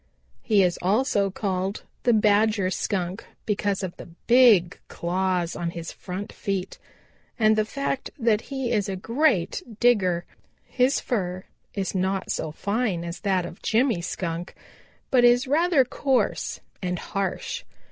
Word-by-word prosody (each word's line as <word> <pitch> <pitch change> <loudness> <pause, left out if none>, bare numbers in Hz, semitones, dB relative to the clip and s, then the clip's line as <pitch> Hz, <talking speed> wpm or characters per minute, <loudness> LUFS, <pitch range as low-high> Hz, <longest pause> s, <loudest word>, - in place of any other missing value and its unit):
He 210 -4 +3
is 180 -1 +1
also 200 +1 +2
called 190 0 -2 0.2
the 245 - +3
Badger 210 -2 +3
Skunk 185 -1 -2 0.2
because 205 -2 -1
of 180 -2 -4
the - - -10 0.2
big 230 -8 +5
claws 180 0 -1
on 170 - -2
his 170 0 -6
front 190 +2 -7
feet 195 -2 -3 0.6
and 215 -1 +4
the 215 0 +2
fact 275 +3 -3
that 225 -4 +2
he 265 -3 -2
is 210 -3 +1
a 195 - -2
great 225 - +1 0.2
digger. 185 -8 +3 0.4
His 255 +2 +1
fur 185 -5 -2 0.3
is 195 -2 -2
not 190 0 -1
so 155 - -2
fine 200 0 -1
as 170 +1 -6
that 190 -3 0
of 175 - -10
Jimmy 225 -4 +2
Skunk, 170 0 -4 0.6
but 250 -2 +5
is 245 +2 +5
rather 305 -1 +3
coarse 265 +1 0 0.2
and 180 -1 -2
harsh. 195 +2 -3
200 Hz, 140 wpm, -25 LUFS, 180-240 Hz, 0.6 s, big